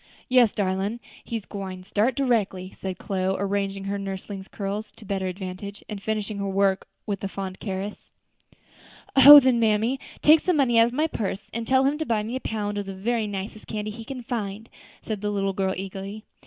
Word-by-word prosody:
"Yes, 250 -4 +5
darlin', 195 +3 -1 0.2
he 230 - -3
gwine 190 -2 -7
start 210 +6 +1
directly," 210 -8 0
said 190 -1 -5
Chloe, 190 -1 -1
arranging 195 0 -1
her 200 +1 -2
nursling's 195 0 -6
curls 205 +1 -4
to 220 - -14
better 190 -1 -2
advantage, 190 +2 -6
and 205 -2 -6
finishing 215 -1 -2
her 200 0 -2
work 195 0 +1 0.2
with 200 -2 -3
a - - 0
fond 190 -1 -6
caress. 195 0 -5 1.1
"Oh! 285 +2 +12
then, 255 -3 +3
mammy, 225 +4 +2 0.2
take 310 +2 +8
some 360 0 +1
money 240 -5 +4
out 230 - +6
of 240 - -6
my 300 +4 +2
purse, 205 -8 -4
and 230 0 -3
tell 260 0 +4
him 285 +3 +1
to 315 - -1
buy 220 -3 +1
me 230 +4 -4
a - - -1
pound 205 -2 -2
of 200 - -5
the 195 - -5
very 220 +3 -1
nicest 205 +1 -6
candy 215 -1 -3
he 225 +2 -8
can 255 +1 -7
find," 220 -3 -4 0.3
said 215 -3 -4
the 210 - -1
little 195 -1 0
girl, 190 0 0
eagerly. 195 +3 -6
205 Hz, 195 wpm, -25 LUFS, 195-230 Hz, 1.1 s, Oh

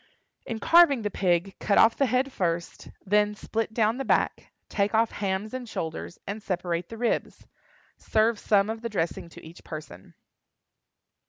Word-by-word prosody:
In 230 - -3
carving 305 -2 +5
the 210 - -2
pig, 185 0 +1
cut 200 - +1
off 225 0 +6
the 275 - +2
head 255 +3 +1
first; 170 -2 -2 0.2
then 210 +1 +2
split 225 +1 -3
down 220 +1 +1
the 270 - -2
back, - - 0 0.2
take 205 +1 0
off 225 +1 +3
hams 200 +2 -3
and 255 -3 -5
shoulders, 160 0 -5
and 205 +2 -5
separate 175 -3 -2
the 225 - -8
ribs. 235 0 -2 0.5
Serve 220 0 +1
some 200 -1 +3
of 225 0 -6
the 235 - -3
dressing 170 -4 -2
to - - -13
each 165 +2 -13
person. 95 - -10
210 Hz, 165 wpm, -26 LUFS, 180-225 Hz, 0.5 s, off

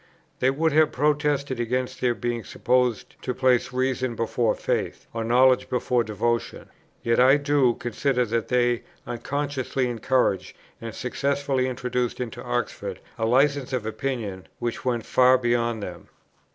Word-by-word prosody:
They 130 - +3
would 160 +4 +1
have 155 +1 +4
protested 145 -2 0
against 125 +2 -2
their 120 -1 +2
being 120 -1 -3
supposed 125 -2 0
to 125 - -3
place 130 -2 +2
reason 130 -1 -1
before 115 0 0
faith, - - -2
or 115 0 -2
knowledge 125 +2 +4
before 125 -1 +1
devotion; 115 +2 -2 0.3
yet 115 0 +2
I 130 +3 +7
do 140 -4 +2
consider 125 +2 0
that 115 0 -1
they 120 -1 +2 0.2
unconsciously 135 +1 -2
encouraged 115 -5 0 0.2
and 115 -1 -6
successfully 140 0 -1
introduced 125 -1 -2
into 125 -2 -5
Oxford 120 -6 -3 0.2
a 110 - +1
licence 135 +2 +2
of 125 -4 -1
opinion 110 -5 -4
which 120 -1 -3
went 120 -3 -1
far 130 0 +5
beyond 120 -3 0
them. 90 -3 -8
125 Hz, 140 wpm, -25 LUFS, 115-130 Hz, 0.3 s, I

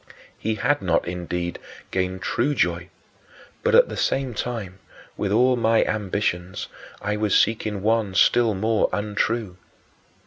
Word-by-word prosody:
He 110 0 -2
had 145 +6 +1
not, - - +1
indeed, 90 0 -4 0.3
gained 95 -1 -2
true 140 +5 0
joy, 85 -3 0 0.7
but, - - +2
at - - +7
the - - -6
same 135 -2 0
time, 105 -5 -4 0.4
with 100 - -2
all 125 +4 +4
my 115 -1 +3
ambitions, 95 -3 -2 0.4
I 105 0 -1
was 105 -1 +2
seeking 110 -3 0
one 110 -3 +1
still 115 +2 +4
more 110 +3 +1
untrue. 105 -1 -1
105 Hz, 135 wpm, -23 LUFS, 95-115 Hz, 0.7 s, at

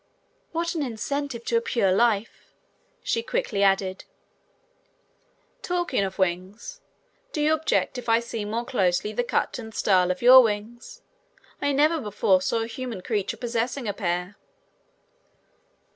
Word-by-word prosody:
"What 335 +1 -2
an 325 - -2
incentive 270 0 -3
to 235 - +1
a - - +1
pure 215 -5 +1
life," 220 +1 0 0.5
she - - 0
quickly 465 - -2
added. 195 -1 +1 1.6
"Talking 350 - -1
of 190 -1 -4
wings, 190 - -3 0.5
do - - -4
you 300 +1 +3
object 315 -4 0
if 240 - -7
I 225 0 +5
see 235 -2 -5
more 225 +3 -3
closely 195 -3 0
the 245 - 0
cut 240 - -1
and 220 -2 -9
style 185 -3 +3
of 185 +4 -2
your 255 +2 +10
wings? 225 +1 -4 0.6
I 285 0 +1
never 300 +4 +3
saw 210 -6 +2
before 225 +5 -1
a - - -3
human 235 -4 -6
creature 205 0 -2
possessing 240 +1 -2
a 205 - -1
pair." 180 0 -3
230 Hz, 145 wpm, -25 LUFS, 200-265 Hz, 1.6 s, your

